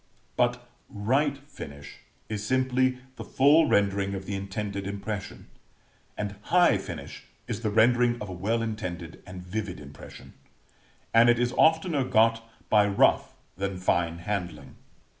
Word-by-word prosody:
But 120 0 0 0.2
right 135 +8 0
finish 70 - -10 0.3
is 105 -1 -4
simply 130 +1 +1 0.2
the - - -6
full 150 +4 +4
rendering 100 -2 +1
of 95 0 -6
the 100 - -5
intended 100 0 -4
impression; 100 +1 -6 0.7
and 100 -1 -4
high 175 - +3
finish - - -8 0.2
is - - -4
the 110 - 0
rendering 120 +3 +3
of 105 - -6
a 95 - -6
well 110 +6 -1
intended 90 -7 -5
and 90 0 -9
vivid 95 0 -5
impression; 70 0 -12 0.8
and 115 +1 +6
it 120 - +4
is 120 +1 0
oftener 160 -1 +3
got 115 -2 +3 0.2
by 105 -1 +4
rough 100 - +2 0.2
than 95 0 -3
fine 85 -2 0
handling. 85 -7 -5
105 Hz, 140 wpm, -27 LUFS, 95-120 Hz, 0.8 s, and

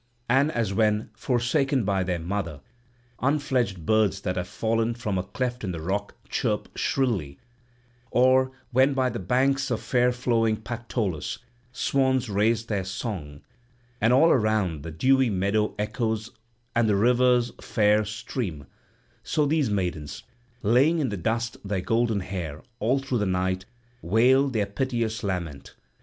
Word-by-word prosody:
And 135 +5 +3
as 110 -4 -1
when, 105 0 +1
forsaken 130 +3 +1
by 100 -1 +1
their 90 -1 -1
mother, 85 -4 -4 0.6
unfledged 130 - 0
birds 105 -2 +2
that 90 - -2
have 90 -1 -3
fallen 115 +3 0
from 105 -6 -2
a - - -2
cleft 125 +4 -3
in 95 -3 -2
the 85 - -5
rock 100 +5 -3
chirp - - -2
shrilly; 105 - -1 0.7
or 130 +2 +4 0.2
when 130 +2 +4
by 130 -1 +1
the - - -4
banks 135 +7 +1
of 120 -3 0
fair 125 +2 +2
flowing 115 -3 +1
Pactolus, 110 - -3 0.3
swans 130 -2 +1
raise 110 +3 +2
their 105 -4 -1
song, 95 - -5 0.6
and 115 - +4
all 135 +7 +6
around 105 - +1
the 85 - -6
dewy 130 - +3
meadow 100 +2 0
echoes 110 +1 -2 0.4
and 115 -2 +3
the 105 - +3
river's 125 +2 +3
fair 105 0 +2
stream; 105 - -5 0.6
so 150 - 0
these 145 -3 +1
maidens, 90 -7 -3 0.4
laying 130 +10 +4
in 145 -6 0
the 105 - -3
dust 115 +6 -2
their 100 -2 -2
golden 115 +2 +1
hair, 85 -6 -5 0.2
all 125 +5 +2
through 135 -3 -2
the 105 - 0
night 95 0 -1 0.4
wailed 130 +8 +3
their 105 -3 +1
piteous 115 +1 -2
lament. 85 -8 -4
110 Hz, 145 wpm, -26 LUFS, 95-125 Hz, 0.7 s, all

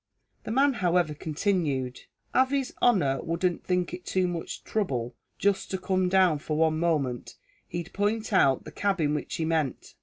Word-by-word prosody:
The - - -4
man, 275 +3 +4
however, 175 -3 +2
continued, 150 -5 -1 0.3
"av 260 0 +4
his 275 -2 -1
honer 160 - +3
wouldn't 170 +1 -1
think 180 -1 0
it 180 0 -6
too 185 0 0
much 170 -2 -5
throuble 130 - -2 0.2
jist 200 -1 +1
to 190 - -1
come 185 -1 0
down 185 -5 +4
for 150 +1 -3
one 160 0 +2
moment, 145 -8 -1 0.3
he'd 175 0 -6
point 215 +2 -1
out 135 -8 +4
the - - -9
cabin 185 -8 0
which 150 - -3
he 160 - -1
meant." 160 -4 -1
175 Hz, 170 wpm, -27 LUFS, 150-195 Hz, 0.3 s, man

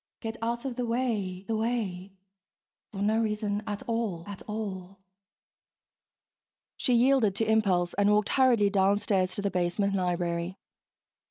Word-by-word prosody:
(Get 225 -1 -5
out 235 +2 -2
of 260 -2 -4
the 250 - -1
way, 215 -7 -1
the 225 - 0
way.... 215 -5 -2 0.8
For 200 -1 -3
no 215 +2 +2
reason 210 -1 -1
at 205 -1 -4
all, 225 -8 -2
at 200 -2 -8
all....) 195 -3 -5 1.8
She 250 - +1
yielded 240 -4 +4
to 225 - 0
impulse 195 -5 +2
and 205 0 +2
walked 210 0 +3
hurriedly 240 -6 +4
downstairs 195 -1 +2
to 205 - -3
the 200 - 0
basement 180 +3 0
library. 175 -1 -1
205 Hz, 140 wpm, -28 LUFS, 190-225 Hz, 1.8 s, yielded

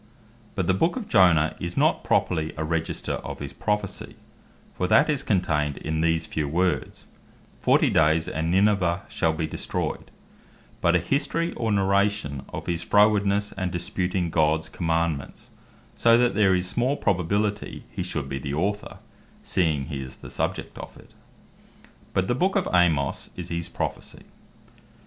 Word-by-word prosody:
But - - 0
the 95 - +2
Book 165 - +1
of 240 -5 -5
Jonas 80 -5 +4
is 85 0 -5
not - - +2
properly 80 0 0
a 80 - -2
Register 80 0 -2
of - - -6
his 70 -1 -7
Prophecy, 105 +8 -3 0.6
(for 90 - -1
that 110 +9 +4
is 145 - -1
contained 75 -8 0
in 80 0 -2
these 80 0 +1
few 75 -2 -2
words, 85 -1 -1 0.5
"Fourty - - +3
dayes 80 +1 +3
and 80 +1 -2
Ninivy 95 -2 +2
shall 80 - +1
be 80 0 -2
destroyed,") 80 - -3 0.7
but 85 +1 +3
a - - +5
History 145 - -1
or 115 -2 -2
Narration 100 -7 +1
of - - -6
his 85 -1 -2
frowardenesse 105 0 +3
and 95 -2 -2
disputing 90 0 -2
Gods 80 0 +1
commandements; 80 -4 -2 0.4
so 115 0 +4
that 120 0 +3
there 100 -2 +4
is 90 0 -1
small 125 +8 0
probability 100 +2 -1
he - - -4
should 80 -6 -3
be 70 0 -4
the 70 +1 -4
Author, 100 +6 -2 0.5
seeing 80 -6 +1
he 70 0 -5
is 65 -1 -8
the - - -11
subject - - -3
of - - -9
it. - - -18 1.0
But 95 0 +1
the - - +1
Book 185 +10 +1
of 195 -3 +1
Amos 80 -6 +2
is 90 -1 -7
his 85 0 -3
Prophecy. - - -5
90 Hz, 160 wpm, -25 LUFS, 80-100 Hz, 1.0 s, a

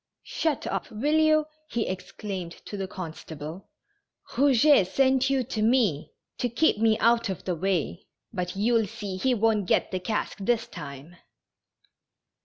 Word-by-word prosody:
" - - -61
Shut 315 -4 -1
up, - - -3
will 285 +8 +1
you! 310 -1 +4
" 310 0 -41
he 235 - -1
exclaimed 185 -1 -5
to - - -6
the 195 -1 -3
constable. 160 -1 -8 0.6
Kouget 275 -4 +5
sent 265 +5 +2
you 270 -1 +2
to 230 -3 -4
me 215 - +2 0.3
to 245 - 0
keep 235 0 +2
me 220 -1 +3
out 230 -1 +3
of 190 - -4
the 185 - 0
way, 170 - -2 0.3
but 180 -1 -3
you^ll 225 0 +2
see 205 -4 -5
he 250 +6 +2
won't 215 -3 +1
get - - +2
the 185 - -1
cask 210 +3 -3
this 230 +3 +1
time." 140 +5 -10
215 Hz, 160 wpm, -27 LUFS, 185-250 Hz, 0.6 s, Kouget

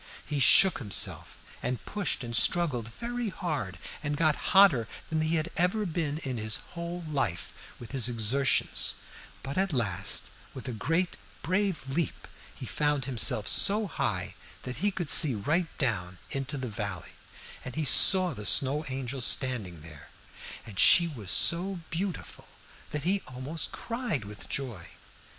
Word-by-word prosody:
He 150 -2 -3
shook 190 +6 +7
himself, 105 -6 -1 0.2
and 125 -5 -3
pushed 200 -11 -2
and 120 -1 -4
struggled 130 - +3
very 235 - -4
hard, 150 - -4 0.2
and 145 -1 -3
got 155 -2 +3 0.2
hotter 155 - +6 0.2
than 160 0 0
he 155 +1 0
had 160 +1 -2
ever 185 +5 +1
been 160 -4 -2
in 130 -3 -3
his 110 -1 -3 0.2
whole 170 0 -5
life 125 - -2 0.2
with 120 - -11
his 130 -3 +2
exertions, 120 +4 +1 0.5
but 140 +6 -3
at 195 -1 +1
last, 100 - -1 0.2
with 130 - -8
a - - -3
great 165 - -1 0.3
brave 185 -5 -1
leap, 155 +5 -3 0.3
he - - -8
found 145 -3 -1
himself 110 -4 +2
so 210 +2 +2
high 180 - -3 0.3
that 125 0 -6
he 205 +6 +1
could 185 -4 -4
see 140 -7 +5
right 155 - 0
down 95 - -2
into 135 +2 -3
the 130 -1 -4
valley, 100 -5 -5 0.5
and 130 - -7
he 155 - -1
saw 185 +4 +6
the 105 -4 -8
Snow 140 +8 +4
Angel 130 0 -4
standing 115 - -1
there, 75 -1 -12 0.6
and 100 -3 -9
she 170 - +7
was 115 - -8
so 175 - +2
beautiful 180 +2 -5 0.4
that 150 -1 -4
he 195 +4 +1
almost 130 +6 -3
cried 230 - -3
with 105 0 -11
joy. 120 -11 -4
140 Hz, 155 wpm, -28 LUFS, 115-170 Hz, 0.6 s, shook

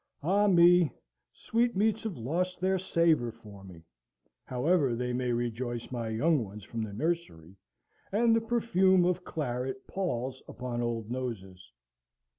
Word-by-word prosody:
Ah 200 +6 +3
me! 175 -3 +6 0.4
sweetmeats 225 -2 0
have 220 -7 -5
lost 175 +10 -2
their 190 +1 +1
savour 165 -9 +2
for 105 -4 -14
me, 90 -4 -13 0.6
however 135 0 +1
they 125 +1 -2
may 125 0 -1
rejoice 120 0 -3
my 120 -3 -3
young 140 +5 +2
ones 105 0 -10
from 115 +3 -5
the 110 -2 -4
nursery, 105 - -3 0.6
and 225 +3 +3
the 230 - +2
perfume 190 -6 +3
of 180 0 0
claret 130 -4 -4
palls 130 -9 -3
upon 125 -1 -4
old 115 -2 -3
noses! 95 - -6
130 Hz, 135 wpm, -30 LUFS, 115-180 Hz, 0.6 s, me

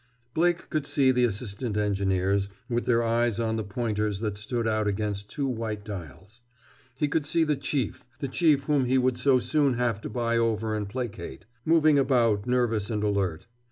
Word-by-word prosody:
Blake 170 +2 +1
could 150 -2 -1
see 135 -3 +3
the 125 -1 +3
assistant 105 0 -3
engineers, 100 -1 +1 0.2
with 120 -1 -2
their 120 -1 +3
eyes 115 -1 +1
on 110 -1 0
the 110 - -2
pointers 105 -1 -2
that 105 -3 -2
stood 115 +3 -2
out 110 -1 +1
against 105 0 -2
two 145 -2 -3
white 110 -4 -3
dials. 95 - -9 0.5
He 145 +3 0
could 150 +1 0
see 165 +2 +3
the 150 -2 +1
Chief, 135 -3 -2 0.2
the 140 - -2
Chief 145 0 +3
whom 140 -2 +2
he 130 +2 +2
would 130 -1 +1
so 135 -2 +4
soon 140 0 +1
have 115 -3 0
to - - -5
buy 115 -1 0
over 110 -1 0
and 105 -2 -3
placate, 115 - -6 0.2
moving 155 -3 +5
about 120 -6 +2
nervous 120 -4 +1
and 105 -2 -1
alert. 100 -6 -1
115 Hz, 185 wpm, -27 LUFS, 105-130 Hz, 0.5 s, moving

